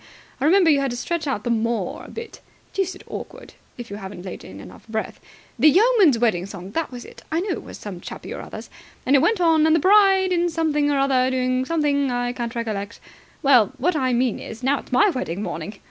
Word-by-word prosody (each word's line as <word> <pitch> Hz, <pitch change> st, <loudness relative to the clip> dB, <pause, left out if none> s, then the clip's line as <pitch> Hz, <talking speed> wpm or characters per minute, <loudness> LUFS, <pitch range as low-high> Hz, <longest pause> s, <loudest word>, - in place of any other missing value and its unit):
I 270 Hz, -, 0 dB
remember 350 Hz, 0 st, +5 dB
you 285 Hz, -, +4 dB
had 275 Hz, -1 st, 0 dB
to 245 Hz, -, -4 dB
stretch 335 Hz, +3 st, -3 dB
out 235 Hz, -7 st, -2 dB
the 240 Hz, -, -1 dB
'mor' 225 Hz, -4 st, -1 dB
a -, -, -12 dB
bit. 455 Hz, -1 st, -9 dB, 0.3 s
Deuced 380 Hz, -1 st, -3 dB
awkward, -, -, -9 dB, 0.2 s
if 240 Hz, -3 st, -8 dB
you 200 Hz, -, -5 dB
hadn't 190 Hz, -2 st, -9 dB
laid 185 Hz, -, -7 dB
in 95 Hz, -, -11 dB
enough -, -, -13 dB
breath. 220 Hz, -1 st, -4 dB, 0.4 s
'The 310 Hz, -, +7 dB
Yeoman's 390 Hz, -, +5 dB
Wedding 205 Hz, -6 st, +1 dB
Song.' 195 Hz, -1 st, -9 dB
That 325 Hz, +7 st, -2 dB
was 245 Hz, -1 st, -8 dB
it. -, -, -13 dB
I 320 Hz, -, +1 dB
knew 395 Hz, +1 st, -2 dB
it -, -, -3 dB
was -, -, -10 dB
some 190 Hz, -4 st, -8 dB
chappie -, -, -8 dB
or -, -, -6 dB
other's. -, -, -9 dB, 0.3 s
And 270 Hz, -, +4 dB
it -, -, +6 dB
went 440 Hz, +4 st, +2 dB
on 325 Hz, -3 st, +4 dB
'And 320 Hz, -, +4 dB
the -, -, +3 dB
bride 385 Hz, +1 st, +5 dB
in 350 Hz, -1 st, +2 dB
something 305 Hz, -3 st, 0 dB
or 285 Hz, -, +1 dB
other 270 Hz, -2 st, +2 dB
is 260 Hz, -, 0 dB
doing 255 Hz, 0 st, 0 dB
something 285 Hz, -3 st, +1 dB
I 245 Hz, 0 st, -1 dB
can't 240 Hz, -1 st, -5 dB
recollect.' 215 Hz, -2 st, -4 dB, 0.4 s
Well, 250 Hz, -7 st, +5 dB
what 340 Hz, +5 st, 0 dB
I 260 Hz, -4 st, +1 dB
mean 245 Hz, -1 st, +1 dB
is, 225 Hz, +2 st, -9 dB
now 275 Hz, +2 st, +2 dB
it's -, -, -14 dB
my 390 Hz, +11 st, +4 dB
wedding 205 Hz, -, -4 dB
morning! 195 Hz, +2 st, -5 dB
260 Hz, 235 wpm, -22 LUFS, 230-330 Hz, 0.4 s, The